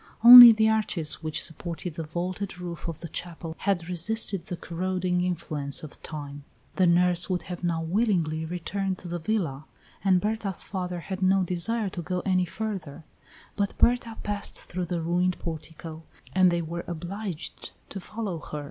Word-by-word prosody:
Only 240 0 +13
the 220 0 +3
arches 210 -9 -1
which 155 -1 -3
supported 170 +1 -5
the 165 - -5
vaulted 180 +4 -4
roof 175 -1 -6
of 165 -3 -6
the 170 - -6
chapel 165 0 -6
had 185 -4 -1
resisted 180 +1 +1
the 180 - -4
corroding 180 +1 -2
influence 155 -6 -1
of 155 - -10
time. 145 -2 -7 0.3
The 185 - +4
nurse 175 +1 +3
would 180 -1 -1
have 180 -1 -8
now 165 -2 -1
willingly 170 -4 0
returned 185 +3 -3
to 180 - -10
the 175 0 -4
villa, 160 -7 -2 0.4
and 190 -2 +4
Berta's 210 -1 -2
father 180 -3 -4
had 190 +2 -6
no 190 0 +3
desire 195 +5 0
to 180 - -6
go 180 +1 -3
any 185 -1 +1
further, 175 -6 -5 0.5
but 200 -1 -2
Berta 235 -2 +2
passed 205 -1 -3
through 180 0 -5
the 170 -1 -3
ruined 175 +2 0
portico, 160 0 -7 0.3
and 185 -1 +5
they 170 -1 0
were 170 +2 -5
obliged 175 +1 -5 0.2
to 195 - -6
follow 200 -3 -5
her. 150 0 -7
180 Hz, 165 wpm, -26 LUFS, 165-195 Hz, 0.5 s, Only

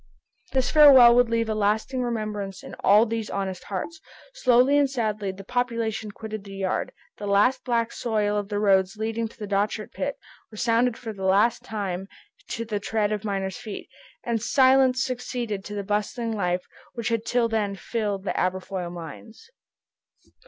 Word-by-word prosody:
This 260 -2 +1
farewell 270 -6 +9
would 245 -1 +4
leave 230 0 +1
a 220 - 0
lasting 215 +5 0
remembrance 215 -5 -3
in - - -10
all 210 +3 +5
these 225 -1 -3
honest 190 -2 -4
hearts. 315 - -5 0.3
Slowly 255 - +4
and 280 -1 +3
sadly 215 -6 -2
the 195 +1 -11
population 230 -2 -2
quitted 215 0 -7
the 195 -1 -10
yard. 190 -1 -2 0.3
The 205 - -5 0.4
black 235 -2 0
soil 210 -3 -1
of 205 -1 -2
the 205 - -2
roads 195 -1 +3
leading 225 +1 -2
to - - -18
the 215 - -5
Dochart 205 +1 -1
pit 280 0 -3 0.3
resounded 230 +2 +1
for 225 -3 -6
the 195 -2 -8
last 205 +5 +3
time 195 -3 -4 0.4
to 230 - -4
the 215 -2 -2
tread 215 0 -1
of 210 0 -2
miners' 195 -3 -2
feet, 215 -3 -8 0.3
and 230 -2 -1
silence 260 +1 +4
succeeded 245 -5 -3
to 205 - -6
the 200 - -3
bustling 210 +3 -2
life 180 -4 -1 0.3
which 235 -1 -2
had 230 -1 0
till 235 0 +1
then 210 -3 -1
filled 205 -2 -3
the 195 - -2
Aberfoyle 185 -1 -2
mines. 175 - -10
215 Hz, 165 wpm, -25 LUFS, 200-235 Hz, 0.4 s, farewell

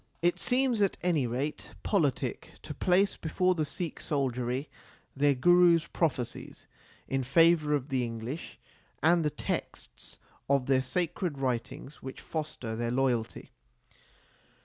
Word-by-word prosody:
It 175 0 +2
seems, 250 -3 +2
at 200 - +2
any 160 -8 +2
rate, 130 +6 -4
politic 155 - 0
to - - -6
place 190 +2 +2
before 180 +3 +1
the 155 -3 -1
Sikh 165 +3 -5
soldiery 130 -1 -1 0.5
their 140 0 +3
Guru 175 +5 +6
s 165 0 -1
prophecies 130 -8 -3 0.4
in 135 0 0
favour 150 +3 +4
of 140 0 -3
the 130 -2 +1
English 115 +6 -5 0.5
and 170 +1 +4
the 150 - +2
texts 65 - -5 0.3
of 140 -2 +3
their 130 -1 +3
sacred 170 +3 -2
writings 130 +2 -3
which 130 0 -7
foster 150 -8 -5
their 115 +1 -2
loyalty. 125 -3 -1
145 Hz, 130 wpm, -29 LUFS, 125-170 Hz, 0.5 s, Guru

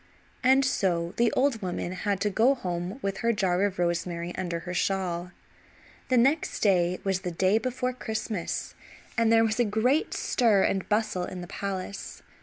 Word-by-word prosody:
And 265 +1 +5
so 175 -8 0
the 235 -1 +3
old 260 -4 +1
woman 180 -1 -3
had 195 +1 -1
to 210 0 +1
go 240 +7 +4
home 180 -2 -4
with 195 -1 -2
her 235 - +2
jar 190 -4 +1
of 200 -2 -2
rosemary 170 0 -2
under 170 -2 -3
her 180 +1 -6
shawl. 180 -2 -1 0.8
The 255 - +3
next 275 +7 +2
day 180 -3 +3
was 190 -1 0
the 180 - -3
day 185 +5 +2
before 255 +1 -2
Christmas 220 -6 -4 0.4
and 230 -1 +3
there 225 0 +6
was 220 +1 -1
a - - +5
great 235 +8 +1
stir 220 -6 +3
and 190 -1 0
bustle 210 -4 0
in 180 0 -7
the 175 - -7
palace. 200 0 -5
195 Hz, 175 wpm, -27 LUFS, 180-230 Hz, 0.8 s, there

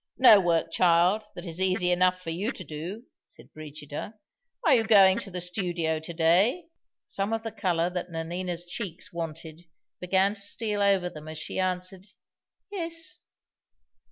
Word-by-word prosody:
"No 245 -5 +8
work, 165 -3 +1
child, 180 +5 +3
that 175 - -8
is 170 +1 -5
easy 185 -1 +2
enough 185 +1 +3
for 165 - -4
you 195 +9 -2
to 185 - -8
do," 170 - -7 0.2
said - - -14
Brigida. 150 +5 -8 0.5
"Are 310 - +6
you 235 -3 +4
going 195 -4 +6
to - - -6
the 180 -1 -5
studio 175 -3 -2
to 160 +2 -8
day?" 190 - +3 0.4
Some 200 +3 -2
of 225 0 -2
the 225 - -4
color 180 -5 0
that 180 0 -4
Nanina's 175 +1 -4
cheeks 180 0 -6
wanted 165 0 -6 0.3
began 190 +2 +2
to 205 - -9
steal 210 0 -2
over 195 -3 +3
them 155 -3 -9
as 155 0 -7
she 160 - -4
answered 185 +1 -2 0.6
"Yes." 335 -4 -3
180 Hz, 160 wpm, -27 LUFS, 165-200 Hz, 0.6 s, No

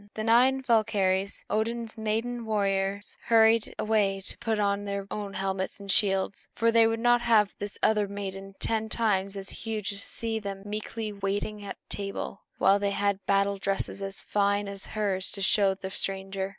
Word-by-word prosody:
The 215 - -3
nine 255 +4 +4
Valkyries, 200 -5 +1
Odin's 225 +1 -1
maiden 225 +2 -2
warriors, 200 -1 -1
hurried 225 -1 +4
away 205 -3 +1
to - - -5
put 225 -1 0
on 200 0 +1
their 200 -1 -3
own 205 -2 -4
helmets 190 0 -2
and 200 -1 -3
shields; 195 -1 +1
for 230 0 +3
they 230 0 +6
would 225 0 -1
not 240 +1 +4
have 220 -4 +4
this 205 0 -4
other 210 -2 +3
maiden, 195 -1 -6
ten 220 -1 -1
times 200 -4 +1
as 195 0 -5
huge, 215 -3 -3
see 225 +1 -2
them 195 -2 -6
meekly 215 +1 -4
waiting 205 +1 -3
at 200 - -6
table, 200 0 -3 0.2
while 200 +1 +4
they 200 0 +1
had 200 -1 0
battle 200 0 +2
dresses 195 0 -2
as 195 0 -5
fine 200 0 +1
as 200 0 -7
hers 195 -3 0
to 200 - -5
show 195 -1 +3
the 190 0 -7
stranger. 195 0 -2
205 Hz, 170 wpm, -28 LUFS, 195-220 Hz, 0.2 s, they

